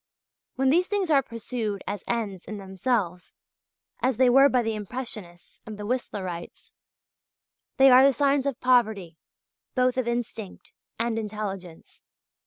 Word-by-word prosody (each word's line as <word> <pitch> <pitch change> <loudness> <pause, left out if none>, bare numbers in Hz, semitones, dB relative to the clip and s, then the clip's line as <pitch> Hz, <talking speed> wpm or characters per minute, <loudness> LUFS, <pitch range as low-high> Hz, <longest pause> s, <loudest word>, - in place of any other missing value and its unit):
When 265 0 +2
these 355 +4 +3
things 395 -5 -1
are 280 -2 +5
pursued 230 -4 -5
as 205 -1 -5
ends 210 -6 -3
in 215 - -6
themselves, 190 -2 -2 0.7
as 255 -2 +1
they 255 -1 +5
were 275 +2 +7
by 250 -2 +2
the 225 0 -1
Impressionists 210 -5 -7
and 215 -1 -8
the 210 - -6
Whistlerites, 195 -7 -5 1.0
they 270 -1 +7
are 255 +1 +8
the 275 - +6
signs 280 0 +1
of 275 -2 -2
poverty, 220 -10 +1 0.6
both 255 0 +2
of 250 - -2
instinct 230 -4 -5 0.2
and 230 0 -1
intelligence. 200 -5 -7
230 Hz, 140 wpm, -26 LUFS, 200-255 Hz, 1.0 s, are